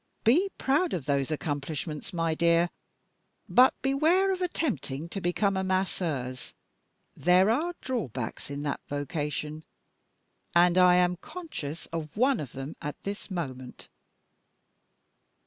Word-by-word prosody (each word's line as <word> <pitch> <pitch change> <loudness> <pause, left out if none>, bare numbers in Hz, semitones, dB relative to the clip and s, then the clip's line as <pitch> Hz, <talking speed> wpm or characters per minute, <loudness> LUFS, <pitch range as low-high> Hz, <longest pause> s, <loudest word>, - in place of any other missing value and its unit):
Be 335 - +4
proud 300 +7 +1
of 155 -7 -4
those 140 -2 +1
accomplishments, 150 +1 -3
my 165 -3 0
dear, 170 +2 +3 0.8
but 255 +1 +6
beware 325 +8 +3
of 370 - -5
attempting 235 - -2
to 195 - -4
become 195 +3 +1
a 190 - 0
Masseuse. 165 -9 -2 0.6
There 180 +4 +4
are 330 +9 0
drawbacks 135 - -4
in 140 0 -4
that 145 - -2
vocation 150 +1 -3 0.9
and 175 0 +6
I 180 -1 +7
am 180 0 +3
conscious 180 - -7
of 160 +1 -5
one 260 +2 +3
of 140 -5 -6
them 135 +3 -6
at 150 - -4
this 200 +2 -5
moment." 130 -9 -6
175 Hz, 125 wpm, -28 LUFS, 145-230 Hz, 0.9 s, I